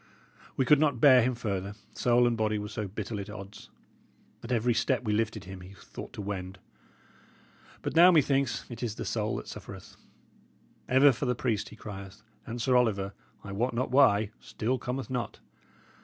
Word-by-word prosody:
"We 130 - +2
could 150 +2 +6
not 145 -5 +2
bear 130 -1 +7
him 125 +2 +1
further, 100 -4 -3 0.2
soul 120 0 +3
and 120 -1 +2
body 110 -1 0
were 105 0 -5
so 105 -1 -4
bitterly 105 +1 -5
at 100 - -8
odds. 100 0 -10 0.7
At 115 - -7
every 120 0 +2
step 125 +2 +1
we 105 -3 0
lifted 110 -1 -1
him, 95 -1 -9
he 95 +2 -12
thought - - -10
to 105 - -6
wend. 95 -1 -5 1.3
But - - -3
now, 175 +2 +9
methinks, 140 -7 +2
it 120 -2 -9
is 115 -4 -2
the - - -5
soul 110 -1 -1
that - - -6
suffereth. - - -10 0.9
Ever 135 +2 +6
for 130 +2 -3
the 125 - +1
priest 115 -4 -1
he - - -12
crieth, 100 -2 -9 0.2
and 120 +1 -5
Sir 125 +2 +2
Oliver, 100 -5 +2 0.3
I 100 - -7
wot 115 +5 -1
not 125 +2 -1
why, 110 -6 +4
still 125 +4 -2
cometh 130 +1 -4
not. 125 -2 -3
115 Hz, 185 wpm, -29 LUFS, 105-125 Hz, 1.3 s, now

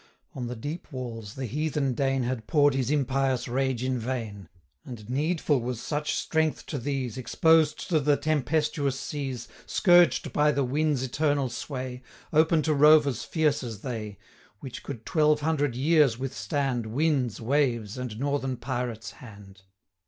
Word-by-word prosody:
175 - - -33
On 120 - -3
the 125 - -5
deep 165 +3 -6
walls, 115 -5 -6
the 135 - -4
heathen 145 +1 -1
Dane 135 0 0
Had 120 -3 -3
pour'd 145 -3 +4
his 130 -2 -1
impious 135 -2 0
rage 130 0 -1
in 130 -1 -1
vain; 110 -6 -5 0.3
And 120 -8 -9
needful 145 +1 0
was 120 -1 -3
such 150 +4 -2
strength 160 -1 0
to 145 - -4
these, 130 -2 -3
Exposed 160 +4 +3
to 160 -3 +3
the 145 0 +2
tempestuous 150 -2 0
seas, 135 -5 -5 0.2
Scourged 175 -3 +4
by 150 0 +3
the 140 - +1
winds' 145 +1 0
eternal 145 0 0
sway, 125 +1 -5 0.3
180 - - -7
Open 160 0 +2
to 155 - +1
rovers 150 -3 +5
fierce 155 -3 +1
as 115 -5 -7
they, 110 -6 -5 0.4
Which 130 -2 -8
could 120 -6 -8
twelve 150 -2 +2
hundred 145 -4 0
years 145 -2 +3
withstand 135 -2 -2
Winds, 130 -1 0
waves, 120 -4 0
and 125 -4 -5
northern 140 -2 -1
pirates' 120 -4 -4
hand. 100 -5 -14
135 Hz, 155 wpm, -27 LUFS, 120-150 Hz, 0.4 s, rovers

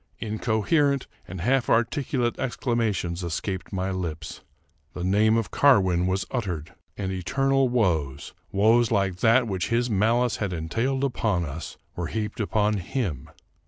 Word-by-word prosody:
Incoherent 120 +6 +1 0.2
and 90 0 -7
half 125 +5 +1
articulate 120 +1 +1
exclama 120 -3 0
tions 85 0 -3
escaped 90 +2 -4
my 95 0 -2
lips. 80 -5 -5 0.5
The 90 - -4
name 105 +4 +3
of 115 - -2
Carwin 95 -10 +4
was 95 +1 0
uttered, 90 - -3 0.2
and 95 -2 -3
eternal 135 +8 +1
woes 80 - 0
— - - -38
woes 110 +4 +4
like 95 -2 +1
that 115 +5 +4
which 95 -5 -2
his 120 +1 +1
malice 115 +4 +2
had 100 -4 -2
en 80 -1 -4
tailed 130 +7 0
upon 110 -9 0
us 80 +2 -7
— - - -42
were 85 -1 -3
heaped 105 +4 -4
upon 105 0 +1
him. 90 - -3
105 Hz, 155 wpm, -25 LUFS, 90-120 Hz, 0.5 s, Carwin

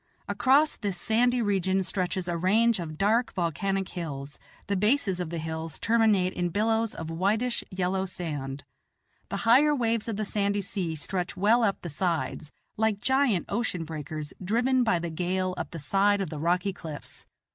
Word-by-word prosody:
Across 285 +4 +3
this 200 -5 -3
sandy 240 +4 +2
region 190 -2 +1
stretches 185 -1 -1
a 175 - -1
range 210 +6 +3
of 155 -3 -5
dark 225 +6 +2
volcanic 190 +3 -1
hills; 145 -5 -6 0.3
the 200 - -1
bases 210 -2 +2
of 175 -3 -3
the 170 - -4
hills 160 0 -4
terminate 215 -5 +3
in 175 -1 -1
billows 220 +3 +1
of 165 0 -5
whitish 215 +8 0
yellow 190 0 -1
sand; 145 -6 -4 0.7
the - - -2
higher 285 +6 +6
waves 230 -4 0
of 225 - -2
the 215 - -1
sandy 200 0 0
sea 180 -4 -3
stretch 180 +4 -3
well 220 +5 +4
up 205 -4 0
the - - -4
sides 160 -2 -2 0.3
like 220 -2 +1
giant 265 -7 +2
ocean 200 -5 -2
breakers 155 -1 -6
driven 245 +6 +2
by 220 -7 +2
the 170 0 -4
gale 185 +2 -1
up - - -4
the 170 - -7
side 200 +6 +2
of 190 -5 -3
the 155 - -5
rocky 180 +5 +1
cliffs. 155 -5 -9
190 Hz, 170 wpm, -27 LUFS, 170-220 Hz, 0.7 s, higher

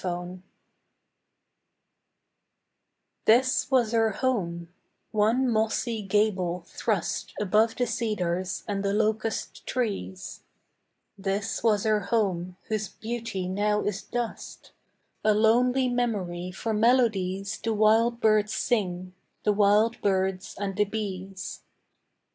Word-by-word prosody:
PHANTOMS 180 0 -4 2.8
This 255 +4 +4
was 250 -5 +3
her 225 -1 +3
home; 180 -8 -2 0.4
one 225 +5 +2
mossy 225 0 0
gable 190 -4 0
thrust 210 -4 -2
Above 215 +3 +2
the 245 - +1
cedars 185 -7 -2
and 200 -2 -2
the 200 0 0
locust 220 +1 -1
trees: 195 -6 -3 0.8
This 200 +2 -2
was 210 -3 +2
her 215 -1 +3
home, 185 -4 -1
whose 215 -2 -2
beauty 225 -4 -4
now 210 +2 +1
is 205 -1 -2
dust, 240 +2 -5 0.5
A 215 -1 +4
lonely 245 +4 +3
memory 200 -8 -1
for 220 +4 -3
melodies 210 -5 +2
The 225 - -2
wild 225 +2 +3
birds 215 -1 +3
sing, 185 -6 -1 0.3
the 210 - +3
wild 210 +3 +3
birds 190 -1 0
and 200 -1 -3
the 210 +1 +3
bees. 195 -2 -5
210 Hz, 105 wpm, -27 LUFS, 190-225 Hz, 2.8 s, This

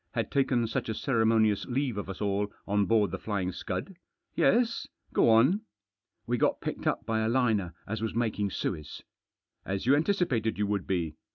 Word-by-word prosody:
" - - -50
Had - - -1
taken 130 -4 +2
such 115 - -3
a 110 - -1
ceremonious 110 -4 +2
leave 130 -1 -1
of 100 -1 -5
us 95 - -6
all 100 0 0 0.2
on 105 0 +2
board 105 -5 +3
The - - -4
Flying 100 -4 -2
Scud. 185 - -5 0.4
Yes? 235 +1 +2 0.3
Go - - +4
on." 130 - +5 0.6
"We 120 +1 -1
got - - +2
picked - - -4
up 115 - 0
by 110 -1 0
a 110 0 +1
liner 110 -9 +1
as 110 +1 -4
was 110 0 -2
making 110 -3 0
Suez." 75 -5 -4 0.3
" - - -59
As 95 +2 -3
you 135 +3 +5
anticipated 150 - +1
you 105 - +1
would 100 -2 -2
be. 85 -5 -1
110 Hz, 190 wpm, -29 LUFS, 100-120 Hz, 0.6 s, on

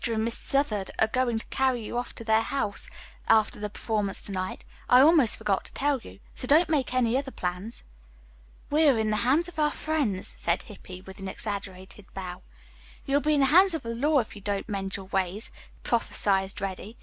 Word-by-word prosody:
and 220 -1 -1
Miss 230 - +3
Southard 225 -9 +1
are - - +4
going 240 0 0
to 225 - -6
carry 260 -4 +1
you 235 - -6
off 245 0 -3
to - - -7
their 220 0 +3
house 225 -3 -2 0.4
after 215 -1 +3
the 210 0 -3
performance 210 -2 -3
to - - -5
night. 185 -1 -4 0.2
I 250 - +7
almost 285 -4 +6
forgot 195 -2 0
to - - -13
tell 285 -1 +1
you. 95 - -13 0.2
So 250 - -4
don't 315 +5 +5
make 280 -6 +1
any 250 -2 +2
other 275 -1 -5
plans." 180 +1 -5 0.9
"We 310 +2 +4
are 270 -5 +5
in 220 -1 0
the 215 - +1
hands 270 - +2
of 345 -3 -8
our 300 -1 +3
friends," 290 -13 -2
said 170 +1 0
Hippy, 185 -3 -11
with 190 +1 -12
an 195 - -6
exaggerated 195 -1 -5
bow. 180 -2 -6 0.6
"You'll 280 +1 +2
be 305 +1 +2
in 285 - +3
the - - +5
hands 370 0 +6
of 320 - -5
the 230 0 -4
law 290 +6 +2
if 220 - -10
you 205 - -10
don't 200 0 -2
mend 195 -2 -3
your 195 - -6
ways," 190 +2 -2 0.3
prophesied 195 -4 +1
Reddy. 195 +3 -6
220 Hz, 210 wpm, -27 LUFS, 195-270 Hz, 0.9 s, I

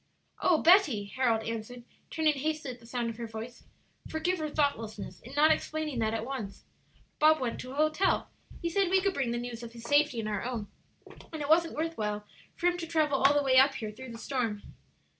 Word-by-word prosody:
"O 345 - +4
Betty," 325 - +5
Harold 235 -4 +2
answered, 230 +2 -5 0.3
turning 315 -2 +2
hastily 295 -1 -3
at 240 - -15
the 230 - -16
sound 235 -1 -2
of 225 - -11
her 235 -1 -5
voice, 225 +2 -8 0.4
"forgive 350 +2 -1
our 305 - -2
thoughtlessness 225 - -2
in 255 +4 -11
not 305 +2 +6
explaining 310 -4 -1
that 220 0 0
at 225 0 -3
once! 245 -7 -6 0.6
Bob 310 +1 +5
went 240 -3 -2
to 255 +1 -7
a - - -8
hotel; 310 +6 +2 0.4
he - - +1
said 375 +2 +1
we 380 +1 +4
could 395 -1 +1
bring 270 -6 -1
the 240 - -1
news 240 -1 -5
of 235 -1 -9
his 235 -1 -11
safety 290 0 +3
and 215 - -3
our 205 -2 -2
own, 240 -4 -3 0.7
and 315 - -5
it 285 - -5
wasn't 330 +1 +4
worth 325 -1 -3
while 210 -1 -2 0.3
for - - -5
him 355 0 +2
to 335 - -4
travel 305 -4 +1
all 275 +2 +5
the 290 - +3
way 260 -1 +4
up 270 +1 +5
here 215 -2 -4
through 255 +3 -10
the 230 - -8
storm." 230 -4 -2
260 Hz, 220 wpm, -30 LUFS, 230-310 Hz, 0.7 s, not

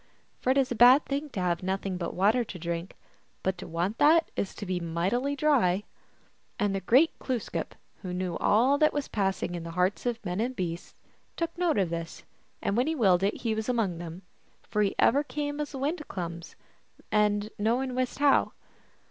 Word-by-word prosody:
For - - -2
it 265 - +4
is 265 -2 +2
a - - 0
bad 250 +5 +7
thing 285 +2 -3
to 210 - -5
have 175 -2 0
nothing 190 0 -2
but 170 -2 -4
water 215 +7 +3
to 205 - -8
drink, 170 +1 -4 0.5
but 190 0 0
to - - -7
want 175 +6 -2
that 320 +3 +5
is 195 - -3
to 205 - -6
be 185 -1 -1
mightily 185 +12 -1
dry. 245 -11 +2 0.7
And 205 -1 0
the 195 - -1
great 260 - +3
Glooskap, 250 -4 -3 0.3
who 185 - -5
knew 180 -1 -2
all 255 +7 +3
that 305 - +4
was 290 -1 -2
passing 195 -3 -1
in 175 - -4
the 165 - -7
hearts 185 +6 +1
of 235 -2 -3
men 180 +1 -2
and 255 +3 -2
beasts, 175 -4 -4 0.4
took 335 0 -2
note 345 -5 +1
of 185 -4 +1
this, 165 0 -5 0.4
and 200 - 0
when 245 +4 +2
he 320 - 0
willed 190 - +4
it 200 +2 -1
he 225 -2 0
was 220 +2 -3
among 210 -9 0
them; 170 +2 -8 0.4
for 210 - -1
he 200 -2 +1
ever 285 +2 +4
came 290 +1 -4
as 295 -1 -4
the - - -5
wind 300 +5 -1
comes, 170 -2 -6 0.6
and 210 0 +2
no 225 +3 +2
man 260 -1 -3
wist 255 0 -2
how. 285 0 +3
210 Hz, 205 wpm, -28 LUFS, 180-265 Hz, 0.7 s, bad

